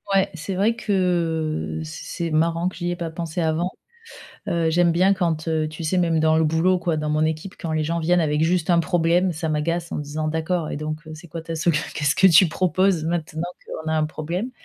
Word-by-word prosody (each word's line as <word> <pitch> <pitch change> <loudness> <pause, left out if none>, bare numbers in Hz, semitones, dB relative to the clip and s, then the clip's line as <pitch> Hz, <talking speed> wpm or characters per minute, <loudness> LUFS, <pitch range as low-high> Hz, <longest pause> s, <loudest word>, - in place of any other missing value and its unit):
Ouais, 195 - +3
c'est 165 +4 -4
vrai 205 +5 +2
que 165 - -1
c 80 - -8 0.2
c'est 170 -2 -2
marrant 165 +3 +1
que - - -13
j'y 175 0 -2
ai - - -2
pas 170 -1 -4
pensé 165 +1 -4
avant. 165 +3 0 0.8
Heu, 170 -1 +1
j'aime 170 +1 +3
bien 185 +4 +4
quand, 165 -4 -1
heu, 155 -1 0
tu 155 +2 -7
sais 160 +4 0
même 165 -3 +2
dans 160 0 +3
le 160 - +3
boulot 165 +4 +2
quoi, 170 -2 -1
dans 150 0 -2
mon 155 +1 +2
équipe 160 +4 -3
quand 165 - -4
les 155 0 +1
gens 165 +2 -1
viennent 175 +2 +2
avec 150 -1 +1
juste 170 0 +1
un 170 - +5
problème, 175 +1 +2
ça 160 0 -3
m'agace 165 +3 -1
en - - -3
disant: 150 +1 -3
«D'accord 160 +1 -1
et - - -3
donc 155 +2 -5
heu, 160 - -8
c'est 170 +3 -12
quoi 165 +2 -6
ta 165 +1 -6
solu 165 -1 +1 0.2
qu'est-ce 145 -1 +1
que 190 - +5
tu 185 +1 +7
proposes 185 0 +1
maintenant 160 -1 -2 0.2
qu'on 160 0 -6
a - - +1
un 155 - +2
problème?» 170 +9 -4
165 Hz, 235 wpm, -23 LUFS, 155-175 Hz, 0.8 s, tu